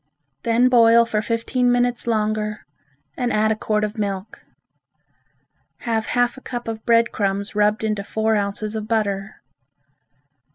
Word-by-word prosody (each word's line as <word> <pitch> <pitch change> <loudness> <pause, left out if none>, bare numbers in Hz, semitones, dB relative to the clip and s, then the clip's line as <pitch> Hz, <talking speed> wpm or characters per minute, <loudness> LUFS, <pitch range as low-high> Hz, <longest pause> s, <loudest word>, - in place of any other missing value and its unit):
Then 235 +2 +3
boil 235 -2 +6
for 215 -2 -1
fifteen 245 +3 0
minutes 245 0 +1
longer 215 -1 -1 0.5
and 245 -1 -1
add 215 +1 +2
a - - +1
quart 215 0 -1
of 215 +1 -3
milk. 200 0 -4 1.4
Have 225 -2 -1
half 245 0 +1
a - - -11
cup 240 -2 -6
of 220 -1 -5
bread 230 0 +4
crumbs 200 0 -2
rubbed 210 +1 +1
into 215 -2 -1
four 220 +2 0
ounces 210 +1 -2
of 215 -1 -4
butter. 200 -3 -2
220 Hz, 140 wpm, -21 LUFS, 210-235 Hz, 1.4 s, boil